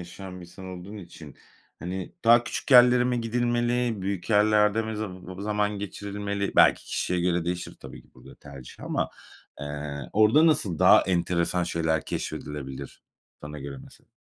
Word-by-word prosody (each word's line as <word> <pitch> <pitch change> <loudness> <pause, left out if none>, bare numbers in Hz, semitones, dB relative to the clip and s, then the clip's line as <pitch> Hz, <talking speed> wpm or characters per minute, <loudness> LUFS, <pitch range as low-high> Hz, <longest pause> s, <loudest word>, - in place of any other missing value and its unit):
yaşayan 90 +1 -9
bir - - -10
insan 90 +2 -12
olduğun 95 +3 -8
için, 85 -6 -12 0.4
hani, 90 +2 -6
daha 120 +1 +6
küçük - - -5
yerlere 125 -1 +7
mi 125 -1 0
gidilmeli, 120 -1 0
büyük 95 +1 -3
yerlerde 105 +1 +4
mi 110 -1 -5
zaba 95 -2 -7
zaman 105 0 -1
geçirilmeli, 100 0 -4
belki - - +5
kişiye 90 -1 -1
göre 90 -1 0
değişir, 90 0 -4
tabii - - -11
ki, - - -27
burada - - -15
tercih 70 -3 -12
ama, - - -2 0.5
eee, 70 -1 -6
orada 110 +10 +5
nasıl 100 - +1
daha - - +7
enteresan 90 -1 0
şeyler 80 -3 -1
keşfedilebilir, 70 -2 -6 0.4
sana 75 0 -8
göre, 70 -1 -7
mesela? - - -19
95 Hz, 150 wpm, -26 LUFS, 85-110 Hz, 0.5 s, yerlere